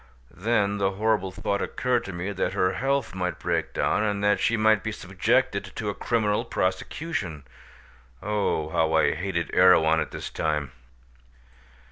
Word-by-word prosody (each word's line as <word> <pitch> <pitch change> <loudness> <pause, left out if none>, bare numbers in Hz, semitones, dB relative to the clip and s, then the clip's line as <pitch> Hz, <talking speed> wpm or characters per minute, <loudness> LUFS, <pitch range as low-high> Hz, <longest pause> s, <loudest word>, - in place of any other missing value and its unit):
Then 100 -1 0
the 100 0 +1
horrible 105 -2 0
thought 100 +1 -2
occurred 125 -2 -1
to 100 - -5
me 90 +3 -4
that 95 - -2
her 90 - +1
health 135 -4 -1
might 90 -4 -2
break - - -1
down, - - +1
and 105 -1 -1
that 105 0 +3
she 115 - +1
might 110 -1 +4
be 110 - -2
subjected 100 +3 0
to 105 -2 -3
a - - -2
criminal 110 0 0
prosecution. 95 - -3 0.8
Oh! 100 -7 -1
how 80 0 +1
I 80 - +3
hated 85 0 -3
Erewhon 80 -3 +5
at - - -2
that - - -7
time. 75 -4 -1
100 Hz, 155 wpm, -26 LUFS, 90-110 Hz, 0.8 s, Erewhon